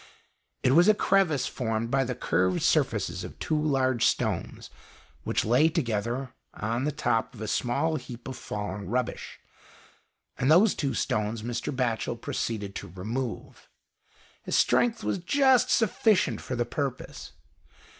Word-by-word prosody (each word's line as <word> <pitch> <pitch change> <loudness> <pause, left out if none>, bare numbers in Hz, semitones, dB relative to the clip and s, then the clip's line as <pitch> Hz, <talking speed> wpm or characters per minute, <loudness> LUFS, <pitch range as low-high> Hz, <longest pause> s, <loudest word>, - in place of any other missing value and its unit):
It 125 - +4
was 170 +7 +6
a 215 - +6
crevice 185 -10 +2
formed 115 -1 -2
by 135 -1 +2
the 125 0 -3
curved 95 -6 0
surfaces - - +1
of - - -9
two 155 -1 -1
large 130 -5 +1
stones - - -2 0.5
which - - 0
lay 125 +8 +4
together 120 - -2 0.2
on 115 +5 -2
the 150 - 0
top 115 -3 -1
of 110 - -11
a 110 - -3
small 130 +9 0
heap 125 -3 -9
of 130 - -5
fallen 105 -3 -5
rubbish, 125 +2 -3 1.0
and 130 +4 +2
these 190 +6 +6
two 140 -3 -2
stones 105 +1 -1
Mr. 120 0 -3
Batchel 120 -3 -1
proceeded 105 -4 -3
to - - -7
remove. 110 +8 -5 0.7
His - - -2
strength 235 -1 +2
was - - -1
just 260 +5 +3
sufficient 210 - +2
for 130 - -4
the 120 0 0
purpose. 135 -2 -5
125 Hz, 145 wpm, -27 LUFS, 115-155 Hz, 1.0 s, was